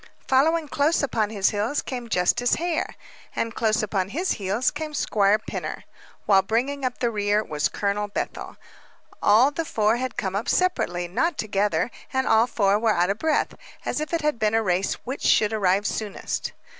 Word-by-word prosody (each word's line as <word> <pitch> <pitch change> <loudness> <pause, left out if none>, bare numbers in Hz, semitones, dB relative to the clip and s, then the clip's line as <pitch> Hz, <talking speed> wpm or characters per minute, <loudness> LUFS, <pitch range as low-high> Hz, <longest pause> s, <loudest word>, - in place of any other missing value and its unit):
Following 310 +4 +3
close 290 +3 +1
upon 220 -6 0
his 200 -3 +1
heels 215 +7 -1
came 245 -3 -6
Justice 230 +6 +2
Hare; 335 -1 -2 0.4
and 230 0 -2
close 220 -2 +1
upon 195 -3 -1
his 350 - -1
heels 205 +5 0
came 305 0 -5
Squire 205 -5 +2
Pinner; 215 - -6 0.4
while 195 -2 +5
bringing 250 +8 -1
up 255 -1 -1
the 240 -2 0
rear 205 0 +1
was 150 -3 -1
Colonel 205 0 -1
Bethel. 205 - -5 0.6
All 230 +7 +5
the 330 +3 -2
four 220 -6 +1
had 255 0 -4
come 190 -2 -2
up 205 - -2
separately, 180 - 0
not 305 - 0
together, 205 -1 0 0.2
and 265 0 0
all 225 +2 +4
four 205 -3 +2
were 220 -1 +2
out 175 +2 +2
of 205 - -4
breath, 315 -1 +1 0.3
as - - -1
if 305 - -4
it 335 -1 0
had 300 -5 0
been 215 0 +2
a 225 - +2
race 185 0 0
which 260 +3 -5
should 210 0 +3
arrive 200 -1 +2
soonest. 210 -1 -3
220 Hz, 180 wpm, -24 LUFS, 200-265 Hz, 0.6 s, while